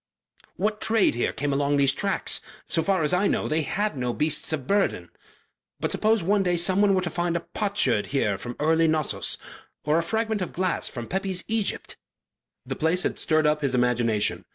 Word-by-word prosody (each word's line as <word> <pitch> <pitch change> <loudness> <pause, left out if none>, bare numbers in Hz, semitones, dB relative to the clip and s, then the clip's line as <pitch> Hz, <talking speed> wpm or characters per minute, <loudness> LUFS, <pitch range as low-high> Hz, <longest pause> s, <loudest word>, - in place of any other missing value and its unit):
"What 210 +2 -1
trade 220 -2 +3
came 120 - -1
here 145 +1 -1
along 140 +1 +1
these 140 -1 +3
tracks? 195 +7 0 0.3
So 165 - +1
far 190 0 +1
as 150 - +1
I 190 +3 +3
know, - - 0
they 155 +1 +1
had 205 +6 -1
no 125 -2 -2
beasts 150 +3 -1
of 145 -5 -2
burthen. 200 +6 0 0.7
But - - -2
suppose 220 -3 +2
one 200 +3 +2
day 180 -2 +1
someone 195 +3 +3
were 185 - +1
to 175 - -2
find 175 0 -1
a - - -4
potsherd 180 - 0
here 110 -8 0
from 120 +2 -6
early 160 +2 +3
Knossos, 155 -1 0 0.5
or 150 +2 +3
a - - +2
fragment 220 +3 -1
of 180 - -4
glass 185 0 -1
from 120 -2 -6
Pepi's 190 +3 -2
Egypt." 220 -2 -2 0.7
The - - -4
place 165 +4 +1
had - - -2
stirred 155 -1 +2
up 150 0 +2
his 140 -3 0
imagination. 120 -3 +1
165 Hz, 195 wpm, -25 LUFS, 140-195 Hz, 0.7 s, trade